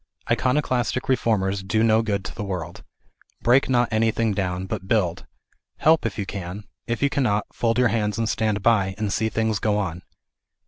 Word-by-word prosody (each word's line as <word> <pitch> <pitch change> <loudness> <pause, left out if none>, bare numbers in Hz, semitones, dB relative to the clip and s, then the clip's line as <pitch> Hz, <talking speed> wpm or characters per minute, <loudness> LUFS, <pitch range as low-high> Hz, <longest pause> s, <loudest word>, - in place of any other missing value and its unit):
Iconoclastic 130 -2 0
reformers 100 -6 +1
do 110 +3 0
no 110 0 +4
good 100 -3 -2
to - - -6
the - - -5
world. 95 -4 -5 0.6
Break 125 +4 +4
not 120 -2 +3
anything 110 0 +1
down, 95 -1 -2
but 95 -1 -5
build. 95 -7 0 0.5
Help, 160 -5 +3
if 100 - -7
you 100 - -2
can; 95 +1 -6 0.2
if 115 +3 -2
you 140 - +4
cannot, 120 -8 +1
fold 115 -1 0
your 125 -2 +4
hands 105 -1 -1
and 115 -1 0
stand 110 -2 0
by, 100 -5 +2
and 105 -1 -2
see 110 - 0
things 110 -2 0
go 105 -1 +1
on. 90 -4 -3
110 Hz, 180 wpm, -23 LUFS, 100-115 Hz, 0.6 s, no